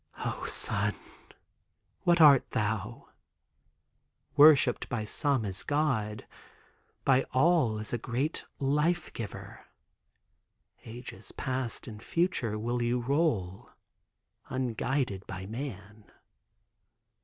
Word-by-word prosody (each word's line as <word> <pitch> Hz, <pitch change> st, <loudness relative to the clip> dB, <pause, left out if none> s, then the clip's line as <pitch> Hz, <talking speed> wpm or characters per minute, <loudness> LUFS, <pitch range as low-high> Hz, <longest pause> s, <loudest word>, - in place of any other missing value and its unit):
O, -, -, -3 dB
sun, -, -, -1 dB, 1.1 s
what 175 Hz, -1 st, +4 dB
art 145 Hz, -5 st, +7 dB
thou? 110 Hz, +4 st, -3 dB, 1.3 s
Worshiped 145 Hz, -4 st, +6 dB
by 110 Hz, -3 st, -2 dB
some 135 Hz, +1 st, +1 dB
as 95 Hz, -2 st, -2 dB
God, 130 Hz, -8 st, -1 dB, 0.8 s
by 135 Hz, -1 st, +5 dB
all 130 Hz, -5 st, +3 dB
as 110 Hz, +2 st, -3 dB
a 120 Hz, -, 0 dB
great 130 Hz, +7 st, -2 dB, 0.2 s
life 150 Hz, +5 st, +1 dB
giver. 115 Hz, -3 st, -8 dB, 1.2 s
Ages 120 Hz, +2 st, -9 dB
past 130 Hz, -2 st, -3 dB
and 105 Hz, -2 st, -9 dB
future 130 Hz, -, 0 dB
will 120 Hz, +3 st, -2 dB
you 120 Hz, +1 st, +1 dB
roll, 120 Hz, -, -1 dB, 0.8 s
unguided 125 Hz, -4 st, -2 dB
by 95 Hz, 0 st, -6 dB
man. 105 Hz, -2 st, -7 dB
125 Hz, 95 wpm, -29 LUFS, 110-140 Hz, 1.3 s, art